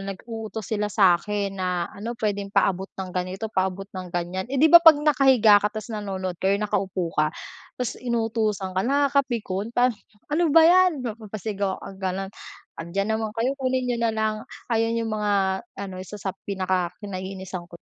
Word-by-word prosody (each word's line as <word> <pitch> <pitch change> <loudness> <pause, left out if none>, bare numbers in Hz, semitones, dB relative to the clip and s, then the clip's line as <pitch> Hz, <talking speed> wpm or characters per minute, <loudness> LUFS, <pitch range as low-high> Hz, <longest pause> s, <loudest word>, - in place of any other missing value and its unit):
nag-uutos 220 +3 -6
sila 210 -1 -1
sa 185 -5 +4
'kin 205 -2 -2
na 180 -2 -1
ano 230 +4 -6
puwedeng 205 -3 -2
paabot 190 -1 +1
ng 190 -1 -5
ganito, 185 +4 -3
paabot 190 +1 -1
ng 185 -1 -6
ganyan. 175 +2 -3
Eh, 275 - -1
'di 305 - +6
ba 340 - +12
'pag 325 -2 +9
nakahiga 265 -8 +5
ka 210 - +2
tapos 215 +2 -7
nanonood 190 -3 -3
kayo 195 +1 +2
nakaupo 190 -4 -2
ka, 155 0 +3 0.5
tapos 250 -3 -2
inutusan 225 -5 -1
ka, 190 - +1
nakakapikon. 255 -7 0
Pa 250 +1 +4 0.4
"Ano 335 +2 +3
ba 325 +2 +7
yan!" 350 -5 +5
mapapasigaw 210 -3 -3
kang 195 -1 -10
gano'n. 190 +1 -2 0.5
"Andiyan 195 +5 -2
naman 220 -1 -2
kayo, 240 +4 +1
kunin 260 -1 0
niyo 245 -1 0
na 230 -1 +2
lang" 220 -1 0 0.4
ayan 225 0 +1
yung 225 -1 -2
mga 200 -3 +1 0.2
ano 195 -1 -5
isa 190 +3 -8
sa 190 -1 -3 0.2
pinaka-kinaiinisan 185 -1 -3
ko. 170 - -11
205 Hz, 170 wpm, -24 LUFS, 190-230 Hz, 0.5 s, ba